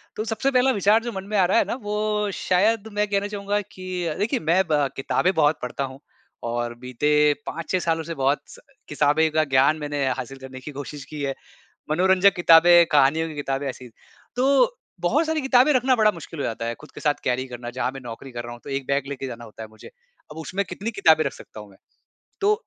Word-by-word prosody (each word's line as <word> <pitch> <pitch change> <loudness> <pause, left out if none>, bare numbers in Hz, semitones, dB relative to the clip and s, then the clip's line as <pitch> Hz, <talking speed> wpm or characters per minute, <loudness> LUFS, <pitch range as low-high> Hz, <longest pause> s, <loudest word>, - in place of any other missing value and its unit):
तो 215 - -2
सबसे 230 +5 -1
पहला 260 0 +3
विचार 210 +1 +3
जो 235 - -4
मन 190 -3 -6
में 210 - 0
आ 185 - +5
रहा 185 - +2
है - - +5
ना, - - -3
वो 210 -2 -1
शायद 210 +5 +1
मैं 210 0 0
कहना 200 0 0
चाहूँगा 205 0 -2
कि 185 -2 -6
अ, 160 - -1
देखिए 230 +5 0
मैं 170 +4 +2
ब 145 -2 +3
किताबें 180 +7 0
बहुत 155 -2 +3
पढ़ता 125 +2 -3
हूँ 135 0 -7 0.5
और 120 0 -2
बीते 150 +4 +2
5-6 165 +3 -2
सालों 165 -2 -1
से 165 - -5
बहुत 135 +1 +1
स - - -13 0.3
किताबें 150 +2 +2
का 155 0 +2
ज्ञान 140 +2 +3
मैंने 145 -2 -2
हासिल 130 +1 -6
करने 130 0 -9
की 140 +3 -8
कोशिश 145 0 -7
की 150 0 -8
है। 135 -1 -1 0.6
मनोरंजक 190 +4 +4
किताबें, 175 0 +7
कहानियों 150 +3 +3
की 155 - -8
किताबें, 140 -1 -3
ऐसी 125 -1 -8 0.5
तो 280 - +3 0.2
बहुत 315 +2 +1
सारी 320 0 0
किताबें 265 +1 +4
रखना 255 -1 +3
बड़ा 215 -2 +4
मुश्किल 165 -2 -10
हो - - -1
जाता 115 0 -3
है 115 - -2
खुद 150 - -14
के - - -9
साथ 150 -2 +2
कैरी 125 +1 0
करना, 120 -1 -7
जहाँ 125 0 -2
मैं 135 - -8
नौकरी 120 +3 -8
कर 120 0 -5
रहा 120 - -7
हूँ, 120 - -11
तो 140 - -8
1 135 -1 -3
बैग 140 0 0
लेके 135 -1 -5
जाना 120 -2 -8
होता 110 0 -11
है 110 - -8
मुझे। 110 0 -14 0.4
अब 150 - -10
उसमें 185 +5 -3
कितनी 205 +4 -5
किताबें 160 -7 +4
रख 140 - -2
सकता 110 - -12
हूँ 105 -1 -12
मैं। 95 - -19 0.7
तो 410 +2 +4
160 Hz, 230 wpm, -23 LUFS, 135-205 Hz, 0.7 s, किताबें